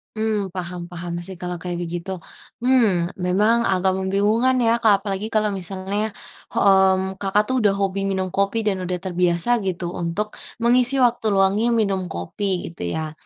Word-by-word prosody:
Mmm 215 -2 -1
paham 175 -1 -5
paham 175 0 -5
sih 185 +2 -6
kalau 180 0 -4
kayak 175 0 -4
begitu, 175 +2 -5 0.5
mmm, 215 -9 +3
memang 215 +6 +2
agak 190 0 +2
membingungkan 205 +7 +2
ya 230 +1 +3
Kak, 205 -3 +4
apalagi 200 +1 -3
kalau 215 -2 +1
misalnya, 195 +3 -2 0.4
hmm, 190 -1 +3
Kakak 200 +1 +2
tuh 260 - +1
udah 205 -2 +3
hobi 195 0 -1
minum 190 -1 -2
kopi 200 +3 0
dan 195 -3 0
sudah 180 0 -2
terbiasa 180 +1 +1 0.2
gitu 175 -2 -2
untuk 175 +5 -2 0.4
mengisi 250 +2 +4
waktu 240 -2 +1
luangnya 195 +3 +3
minum 200 -4 +1
kopi 180 - -3
gitu 170 - -8
ya. 155 -1 -3
195 Hz, 160 wpm, -22 LUFS, 180-210 Hz, 0.5 s, Kak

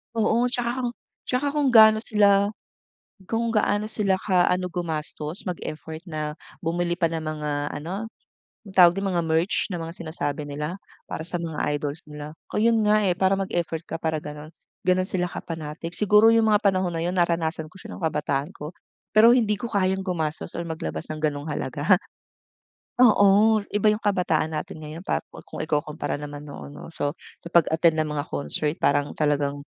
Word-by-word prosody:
Oo. 225 +2 +2
Tsaka 240 -2 0
kung 240 - 0 0.3
tsaka 260 +3 -1
kung 285 -3 +3
gano 220 -1 +8
sila 200 -1 +4 0.7
kung 230 +2 -1
gaano 210 -1 +1
sila 205 -3 +1
ka 180 -3 +3
ano 180 0 0
gumastos 160 -1 -4
mag-effort 160 -1 -6
na 155 -2 -4 0.2
bumili 175 +1 0
pa 170 -2 +1
ng 165 -1 -3
mga 155 -1 -3 0.3
ano, 190 +7 -4 0.6
anong 195 - -11
tawag 180 -1 +7
don? 195 - -2
Ng - - +1
mga 170 -1 +1
merch 165 +7 +1
ng 175 -3 -4
mga 165 - -6
sinasabi 150 -3 -4
nila, 150 +6 -4 0.3
para - - -6
sa 175 - -3
mga 165 -3 -5 0.2
idols 145 +1 -4
nila. 150 0 -8 0.2
Kaya 230 +2 +2
'yon 225 - +3
nga, 210 - +5
eh, 185 - +3
para 190 +2 +2
mag-effort 170 -4 -2
ka 165 - -6
para 160 -1 0
ganon, 150 +1 -8 0.4
ganon 185 0 +4
sila 180 -1 -1
ka-panatic. 165 0 -6
Siguro 210 +4 +5
yung 225 -1 +4
mga 210 0 +3
panahon 185 -3 +2
na 165 - -1
'yon 175 - -1
naranasan 165 -2 0
ko 170 - -19
siya - - -10
ng - - -8
kabataan 150 -2 -1
ko. 150 +3 -7 0.4
Pero 230 +3 +7
hindi 210 -4 +1
ko 235 - -3
kayang 190 -2 +1
gumastos 165 -4 -3
or 170 - -3
maglabas 160 -1 -4
ng 155 - -6
ganong 145 -2 -1
halaga. 150 +2 -1 1.1
Oo, 215 0 +5
iba 210 +1 0
yung 210 - -4
kabataan 180 -6 +1
natin 160 +1 -5
ngayon 155 +4 -8
pa - - +1 0.3
kung - - -8
ikukumpara 150 -1 -2
naman 145 0 -8
noon 145 - -9
'no. 145 - -10
So 145 -3 -2 0.3
sa - - -6
pag-attend 160 -1 +4
ng 155 - 0
mga 145 -1 -2
concert 75 - -1
parang 145 0 +2
talagang 145 -1 0
170 Hz, 180 wpm, -25 LUFS, 155-200 Hz, 1.1 s, gano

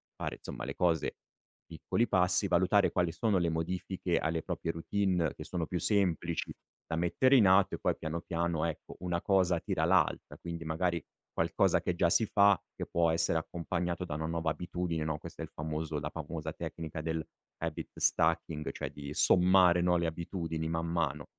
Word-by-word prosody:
fare, - - -4
insomma, - - -7
le - - -5
cose, 85 -3 +1 0.5
piccoli 100 +8 -1
passi, 90 0 +3
valutare 95 +3 +3
quali 90 -2 +1
sono 95 +4 +1
le 85 -2 +1
modifiche 90 +2 -2
alle 80 0 -1
proprie 80 - -3
routine 90 -1 0
che - - -7
sono 85 -3 -3
più 90 - -2
semplici 85 -5 0 0.4
da 80 - -2
mettere 90 +11 +3
in 110 -7 +6
atto 95 +1 +5
e - - -10
poi - - +1
piano 80 +2 -4
piano, 85 -2 -1
ecco, 80 -2 -5
una 85 -1 -2
cosa 95 -3 +2
tira - - -2
l'altra. - - +1
Quindi 85 -1 -6
magari 85 +1 -1 0.3
qualcosa - - +2
che 90 - -1
già 85 0 +3
si 110 - +4
fa, 100 -1 +5 0.2
che - - -5
può 85 -1 +2
essere 80 0 +2
accompagnato 85 +2 -3
da 75 - -4
una 80 +1 -3
nuova 80 0 -1
abitudine, 85 0 -3
no, 80 -1 -2
questo - - -10
è - - -2
il - - -8
famoso 80 0 -3
è - - 0
la 75 0 -4
famosa 80 0 -5
tecnica 80 -1 -6
dell' 80 0 -2 0.3
habit 80 -2 -5
stacking 75 -1 +1
cioè - - -5
di 70 0 -8
sommare, 90 +1 +5
no, 90 0 +3
le 85 -1 0
abitudini 80 -1 -3
man 80 0 -1
mano, 80 -4 -1
85 Hz, 185 wpm, -31 LUFS, 80-90 Hz, 0.5 s, in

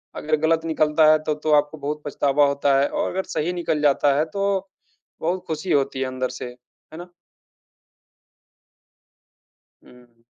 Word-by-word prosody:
अगर 155 +1 0
गलत 165 0 +1
निकलता 155 -1 +3
है 155 - +4
तो 150 -1 -1
तो 155 +1 -2
आपको 150 +1 +2
बहुत 150 +1 -4
पछतावा 145 0 +2
होता 140 -1 +2
है 140 - +2
और - - -2
अगर 190 +1 -2
सही 170 +4 -1
निकल 170 -4 -2
जाता 145 -1 +3
है 155 - +2
तो 195 -1 -1 0.5
बहुत 180 +3 -1
खुशी 160 +3 -4
होती 135 -1 +1
है - - 0
अंदर 130 0 -3
से, 125 - -7
है 125 +5 -14
ना? 175 0 -10 2.7
हुँ। 120 -2 -21
150 Hz, 155 wpm, -22 LUFS, 140-160 Hz, 2.7 s, है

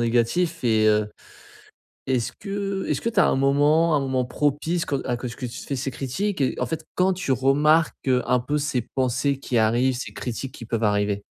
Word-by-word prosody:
négatif. 120 +9 +1
Et 110 -2 +3
heu, 105 -1 +3 1.0
est-ce 125 -3 0
que 195 -1 -3
est-ce - - -1
que 230 - 0
tu - - +1
as - - +5
un - - +2
moment, 145 +4 +3
un - - +3
moment 130 -2 0
propice 150 +6 -1
quand 140 -5 -2
à 120 - -1
quand 125 - -5
est-ce 115 - -7
que 125 - -5
tu 120 +1 -8
te - - -10
fais 140 - -3
ces 135 +1 -2
critiques? 145 +8 -3
Et 130 - 0
en - - -1
fait, 160 -1 -4
quand 185 +1 +3
tu 175 -7 -3
remarques, 145 +5 +3
heu, 125 -1 +3
un 125 - +3
peu 145 +5 -1
ces 140 -4 -1
pensées 130 +2 0
qui 125 -3 -1
arrivent, 120 +4 +2
ces 130 - -6
critiques 125 +2 -5
qui 115 - -9
peuvent 115 0 -2
arriver? 105 -1 +1
135 Hz, 220 wpm, -24 LUFS, 120-155 Hz, 1.0 s, as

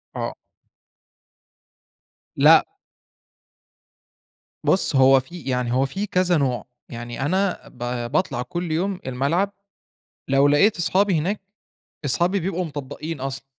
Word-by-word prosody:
آه. - - -3 2.0
لأ. - - +7 2.0
بُص، 185 -6 +2
هو 135 0 +6
في 170 +7 -10
يعني 125 -3 -1
هو 135 +2 +3
في 195 +9 -3
كذا 180 -2 +2
نوع، 130 -4 -1 0.2
يعني 120 +2 -7
أنا 190 +4 0
ب 120 -1 -5
باطلع 120 - 0
كل 175 +4 -4
يوم 185 +4 -1
الملعب 155 +10 0 0.8
لو 135 +1 +4
لقيت 180 +9 +4
أصحابي 185 +3 +2
هناك، 195 +7 -1 0.7
أصحابي 175 +8 +1
بيبقوا 185 0 -2
مطبّقين 145 +1 -6
أصلًا. 135 0 -5
150 Hz, 110 wpm, -23 LUFS, 130-185 Hz, 2.0 s, لأ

